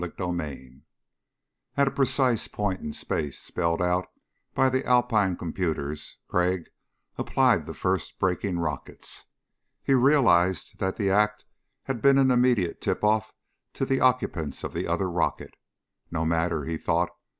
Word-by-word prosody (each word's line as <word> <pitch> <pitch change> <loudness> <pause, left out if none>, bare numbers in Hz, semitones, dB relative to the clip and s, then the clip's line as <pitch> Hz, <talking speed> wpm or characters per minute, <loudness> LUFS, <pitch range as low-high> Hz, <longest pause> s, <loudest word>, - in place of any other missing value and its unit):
CHAPTER 90 0 -3
8 65 -4 -8 1.0
At 140 0 +4
a - - -11
precise 130 -4 +2
point 100 -3 -2
in 75 - -4
space 75 -1 -3
spelled 85 0 -1
out 90 +1 +1 0.5
by 135 - +4
the 130 0 +1
Alpine 115 -7 +2
computers 80 -4 -3
Crag 90 -1 0 0.5
applied - - +2
the - - -6
first 95 -2 -1
braking 95 0 0
rockets. 75 -4 -4 0.6
He 135 - +2
realized 115 - +3
that 95 0 -1
the 100 -3 +1
act 105 +1 +2 0.4
had 130 -4 -4
been 140 0 +5
an 135 -1 +4
immediate 120 -8 +2
tip - - -1
off 105 0 +2 0.4
to 135 - -1
the 135 0 +1
occupants 125 - +1
of - - -5
the - - -2
other 95 - 0
rocket. 85 -1 -1 0.6
No 80 -1 -2
matter, 80 -2 0
he 80 -1 -3
thought. 85 +1 0
95 Hz, 145 wpm, -26 LUFS, 85-125 Hz, 1.0 s, been